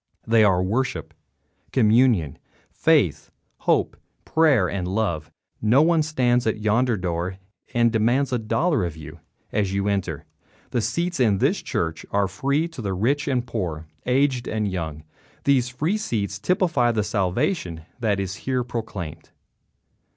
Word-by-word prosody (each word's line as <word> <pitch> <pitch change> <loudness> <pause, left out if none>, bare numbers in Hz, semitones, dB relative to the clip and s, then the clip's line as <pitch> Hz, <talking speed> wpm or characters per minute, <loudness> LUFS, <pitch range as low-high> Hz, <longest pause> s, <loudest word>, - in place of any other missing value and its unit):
They 115 -1 +4
are 95 -3 +3
worship, 100 -5 -2 0.6
communion, 110 - +3 0.3
faith, - - +2 0.3
hope, - - +1 0.3
prayer 145 - +3
and 90 +1 -3
love. 90 -6 -1 0.3
No 120 +7 +5
one 165 0 +3
stands 125 -6 +1
at 110 - +1
yonder 110 +2 +2
door 90 +1 -3 0.4
and 120 -1 +4
demands 120 +5 +1
a 125 - +1
dollar 140 - +1
of 85 -2 -4
you 75 -2 -10 0.3
as 100 -3 0
you 100 +1 0
enter. 95 -7 -2 0.5
The 120 - +1
seats 170 +6 -1
in 110 -6 +3
this - - +1
church 80 -1 -2
are 100 -1 +1
free 140 - 0
to 120 -11 -5
rich 140 - 0
and 125 -3 0
poor, 85 -10 -4 0.2
aged 130 -1 +2
and 110 -1 -1
young. 80 -5 -4 0.4
These 130 -3 +3
free 155 +12 -1
seats 100 - -2
typify 170 - +2
the 105 -2 +1
salvation 95 - -1 0.2
that 105 -4 +1
is 95 -1 -2
here 130 -2 -1
proclaimed. 100 -10 -6
110 Hz, 145 wpm, -23 LUFS, 95-130 Hz, 0.6 s, No